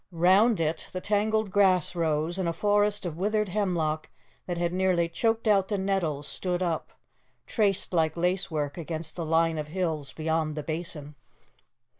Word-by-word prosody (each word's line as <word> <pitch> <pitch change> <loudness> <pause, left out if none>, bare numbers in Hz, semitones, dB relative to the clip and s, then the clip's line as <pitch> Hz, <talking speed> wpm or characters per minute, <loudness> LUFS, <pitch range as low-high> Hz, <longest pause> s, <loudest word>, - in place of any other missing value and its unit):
Round 190 +6 +4
it 160 0 -2
the 185 - -2
tangled 210 +1 0
grass 185 -3 +3
rose, 160 +1 0
and 180 -3 0
a - - -1
forest 205 +1 +1
of 165 -3 -4
withered 210 +1 +1
hemlock 170 -6 -1 0.4
that 175 -1 -2
had 170 0 -1
nearly 180 -2 +2
choked 225 +6 0
out 195 -3 +4
the 205 - -1
nettles, 180 -7 -1
stood 180 +2 -2
up, 165 -3 -2 0.5
traced 200 -4 0
like 160 -1 +1
lacework 170 -4 -1
against 160 -1 -5
the 170 - -3
line 165 0 +2
of 150 - -4
hills 155 -5 -2
beyond 160 -1 -1
the 150 - -4
Basin. 155 -2 -5
175 Hz, 160 wpm, -27 LUFS, 160-195 Hz, 0.5 s, Round